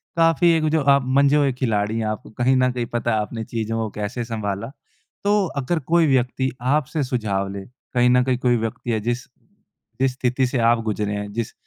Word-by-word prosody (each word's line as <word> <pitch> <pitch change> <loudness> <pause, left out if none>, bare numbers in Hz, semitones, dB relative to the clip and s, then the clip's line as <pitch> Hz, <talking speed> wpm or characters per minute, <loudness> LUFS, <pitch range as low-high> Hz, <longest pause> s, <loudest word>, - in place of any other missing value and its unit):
काफ़ी 165 0 +4
एक 160 - -1
जो 155 0 +2
आप 140 - 0
मंझे 140 +2 +3
हुए 145 -2 +3
खिलाड़ी 110 -4 -1
हैं। 110 - -1
आपको 110 -1 -5
कहीं 130 +2 +3
न 125 0 +3
कहीं 125 -1 -3
पता 120 0 -2
है, 110 - +2
आपने 110 +2 -5
चीज़ों 115 -1 -3
को 110 -1 -2
कैसे 110 +4 -3
संभाला। 110 0 -4 0.5
तो 205 0 +3 0.2
अगर 160 +6 -1
कोई 170 -2 +5
व्यक्ति 130 -1 +1
आपसे 145 +3 0
सुझाव 105 -7 -1
ले, 100 -1 -7 0.3
कहीं 125 0 +4
न 125 0 +4
कहीं 125 -1 0
कोई 125 -1 +2
व्यक्ति 115 +1 -3
है, 110 - +1
जिस 120 +3 -2 0.7
जिस 135 0 +3
स्थिति 125 +1 0
से 125 - -2
आप 120 - +2
गुज़रे 105 -1 -2
हैं, 105 0 -4
जिस 115 0 -3
125 Hz, 205 wpm, -22 LUFS, 110-135 Hz, 0.7 s, कोई